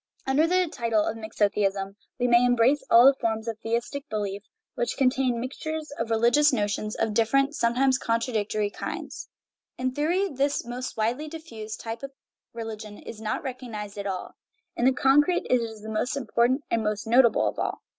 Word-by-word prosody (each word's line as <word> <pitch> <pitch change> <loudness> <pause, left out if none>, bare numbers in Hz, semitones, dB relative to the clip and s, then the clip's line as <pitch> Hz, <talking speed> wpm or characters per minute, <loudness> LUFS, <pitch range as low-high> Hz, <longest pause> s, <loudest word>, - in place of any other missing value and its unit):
Under 280 +4 +3
the 365 +1 +2
title 230 -7 0
of 220 - -2
mixotheism 200 -3 -1 0.2
we 245 -1 +1
may 240 0 +5
embrace 245 +3 +3
all 235 +2 +8
the 275 - +8
forms 225 -3 -2
of 225 -1 -4
theistic 240 +6 -3
belief 205 -2 -3 0.3
which 240 0 -2
contain 255 -2 +2
mixtures 305 +5 -5
of 230 0 -2
re 225 - +2
ligious 240 +7 +4
notions 210 -2 -1
of 225 -1 -1
different, 275 +6 +2
sometimes 260 +1 +2
contradictory, 215 -3 -1
kinds. - - -6 0.5
In 255 0 -1
theory 335 +8 +1
this 280 -4 -1
most 245 +1 -5
widely 240 +8 -1
diffused 230 -10 -8
type 225 0 -5
of 275 0 -7 0.4
religion 220 -2 -7
is 220 - -10
not 215 -1 -2
recognized 225 -6 -6
at 200 - -3
all; 185 -2 -4 0.4
in 240 - 0
the 260 - +6
concrete 295 +7 +3
it 250 -1 +4
is 220 -2 -6
the - - -8
most 220 +5 -1
important 250 +2 +1
and 230 - +2
most 210 -1 -2
notable 235 +1 +4
of - - -3
all. - - -3
235 Hz, 175 wpm, -26 LUFS, 220-270 Hz, 0.5 s, all